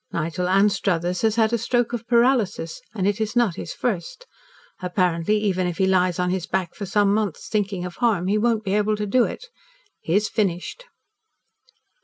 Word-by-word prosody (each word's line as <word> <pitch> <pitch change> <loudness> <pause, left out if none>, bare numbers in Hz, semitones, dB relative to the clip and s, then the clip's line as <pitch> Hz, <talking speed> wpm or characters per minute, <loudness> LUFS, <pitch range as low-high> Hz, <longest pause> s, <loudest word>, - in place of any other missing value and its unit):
Nigel 170 +3 -2
Anstruthers 185 -3 +1
has 220 -1 +2
had 225 0 +2
a 235 - +2
stroke 240 +1 0
of 235 -1 -4
paralysis, 235 -8 +1
and 195 -2 0
it 205 +2 0
is 220 +1 -2
not 240 -6 +3
his - - -6
first. 230 - -3 0.6
Apparently, 180 +1 +1
even 190 -4 0
if 175 -2 -4
he 190 - +2
lies 185 -2 +2
on 180 0 0
his 185 -2 -2
back 180 -3 -2
for 200 - -6
some 200 +1 +2
months 210 -5 -2
thinking 200 -4 -1
of 175 -1 -8
harm, 220 -8 +1
he 205 +3 +1
won't 225 -1 +1
be 195 -1 -2
able 210 +1 +2
to 210 0 -3
do 240 +4 +3
it. - - -6 0.5
He 165 - -1
is 210 +1 +2
finished." 205 - -2
200 Hz, 190 wpm, -23 LUFS, 180-220 Hz, 0.6 s, not